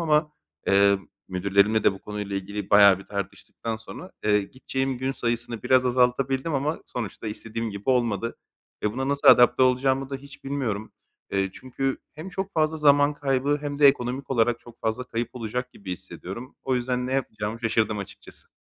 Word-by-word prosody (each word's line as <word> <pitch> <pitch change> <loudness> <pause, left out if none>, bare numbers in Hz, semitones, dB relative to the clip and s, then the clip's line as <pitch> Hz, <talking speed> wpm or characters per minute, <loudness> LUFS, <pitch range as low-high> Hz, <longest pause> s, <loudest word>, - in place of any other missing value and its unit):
ama, 150 -2 +2 0.3
eee, 100 0 +5 0.3
müdürlerimle 100 +3 +2
de - - +5
bu 95 - -10
konuyla 105 -1 -4
ilgili 100 +1 -5
bayağı 100 -2 +8
bir 100 - -11
tartıştıktan 105 +3 -5
sonra, 130 +10 -10
eee, 105 -1 +3
gideceğim 130 +3 -3
gün 130 +1 -1
sayısını 120 -3 -3
biraz 130 0 +4
azaltabildim 130 +4 +1
ama 145 +4 -1
sonuçta 115 -2 -5
istediğim 115 +1 -4
gibi 100 +6 -2
olmadı 115 -3 0 0.5
ve 105 - 0
buna 130 +2 -2
nasıl 140 0 +3
adapte 125 +1 +7
olacağımı 130 +1 +2
da 135 - -2
hiç 140 +1 -14
bilmiyorum. 125 -7 -3 0.4
Eee, 95 -1 +1
çünkü 135 +1 -3 0.2
hem 155 +5 -7
çok 190 +1 -4
fazla 160 0 +2
zaman 145 -1 +4
kaybı 140 0 +1
hem 145 -1 -4
de 145 -1 +8
ekonomik 130 +1 -1
olarak 120 -2 +2
çok 120 -1 -15
fazla 110 +3 -1
kayıp 120 -1 -3
olacak 125 +2 -4
gibi 95 -2 -7
hissediyorum. 95 +7 -8
O 130 - 0
yüzden 125 0 -1
ne 130 - -3
yapacağımı 110 -4 -2
şaşırdım 110 -2 +1
açıkçası. 100 - -9
125 Hz, 170 wpm, -25 LUFS, 105-135 Hz, 0.5 s, bayağı